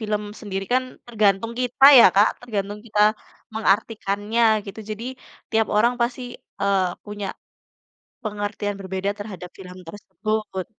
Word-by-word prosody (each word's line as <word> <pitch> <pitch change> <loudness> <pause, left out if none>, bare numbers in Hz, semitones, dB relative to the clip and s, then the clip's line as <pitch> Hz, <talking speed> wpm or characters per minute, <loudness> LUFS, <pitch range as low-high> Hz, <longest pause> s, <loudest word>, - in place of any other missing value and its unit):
film 210 -1 -2 0.2
sendiri 195 -2 -4
kan 255 +1 +3 0.2
tergantung 215 -1 +1
kita 250 +2 +2
ya, - - +9
Kak, 205 +2 +6
tergantung 205 -4 -4
kita 215 -2 -1 0.5
mengartikannya 215 +1 0 0.2
gitu. 200 - -9
Jadi, 215 +2 -5 0.5
tiap 220 -1 +2
orang 235 +3 +4
pasti, 240 +2 0 0.4
eee, 195 -1 +2 0.2
punya 205 -1 -6 1.0
pengertian 205 -1 -3
berbeda 190 +1 -3
terhadap 195 -4 -8
film 180 -1 -10
tersebut. 210 0 -4
210 Hz, 120 wpm, -23 LUFS, 195-225 Hz, 1.0 s, ya